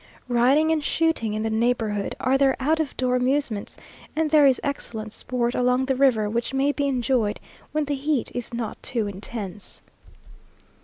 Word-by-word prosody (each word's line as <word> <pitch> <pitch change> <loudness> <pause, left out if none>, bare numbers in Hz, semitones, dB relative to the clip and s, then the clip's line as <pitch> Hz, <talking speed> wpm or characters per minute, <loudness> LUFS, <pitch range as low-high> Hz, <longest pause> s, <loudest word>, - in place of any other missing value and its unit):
Riding 265 +7 +4
and 310 -2 +1
shooting 300 -10 0
in 215 - -2
the 220 - -1
neighbourhood 220 -3 0
are 260 +1 +2
their 270 -1 +3
out 310 +5 +1
of 310 -3 -2
door 250 -1 +1
amusements, 250 -4 0 0.4
and 315 -1 0
there 300 -2 +7
is 265 - +3
excellent 220 -6 -4
sport 240 -1 -2
along 250 +1 +2
the 265 0 0
river, 250 -6 +3
which 235 +5 -2
may 275 +2 +2
be 285 -1 -1
enjoyed 245 -5 0 0.3
when 305 0 0
the 290 - -2
heat 280 -2 -1
is 245 -2 -4
not 235 -2 -5
too 230 -4 -2
intense. 205 0 -6
250 Hz, 170 wpm, -24 LUFS, 225-280 Hz, 0.4 s, there